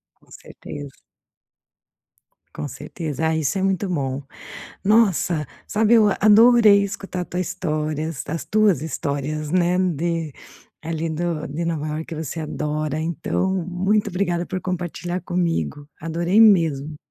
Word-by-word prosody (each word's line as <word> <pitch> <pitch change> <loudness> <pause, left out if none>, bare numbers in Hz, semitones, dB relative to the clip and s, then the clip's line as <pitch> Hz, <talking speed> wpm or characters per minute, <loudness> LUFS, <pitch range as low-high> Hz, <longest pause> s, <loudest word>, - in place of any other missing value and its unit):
Com - - -28
certeza. 145 -1 -9 1.6
Com 145 - -4
certeza, 155 +2 -4
ah, 160 - +1
isso 160 +5 0
é - - -1
muito 195 +1 0
bom, 140 -5 -2 0.6
nossa, 190 - +3 0.2
sabe 220 +2 +2
eu, 215 -3 +6
a - - -1
adorei 215 -1 +7
escutar 195 -2 -4
a - - -4
tua 180 - -4
histórias, 155 -4 -2
as 165 +1 -3
tuas 210 -9 +2
histórias, 150 0 -3
né, 180 0 +2
de 165 -3 -1 0.5
ali 165 0 -2
do 160 -1 -2
de 155 +4 -4
Nova 160 -2 -2
Iorque 155 +2 -4
você 160 0 -4
adora, 150 0 -2
então 170 +3 -1 0.2
muito 195 +4 +1
obrigada 175 -2 -1
por 185 -1 -4
compartilhar 180 0 -4
comigo. 165 - -2
Adorei 170 +6 +2
mesmo. 155 -8 +4
170 Hz, 135 wpm, -22 LUFS, 155-185 Hz, 1.6 s, adorei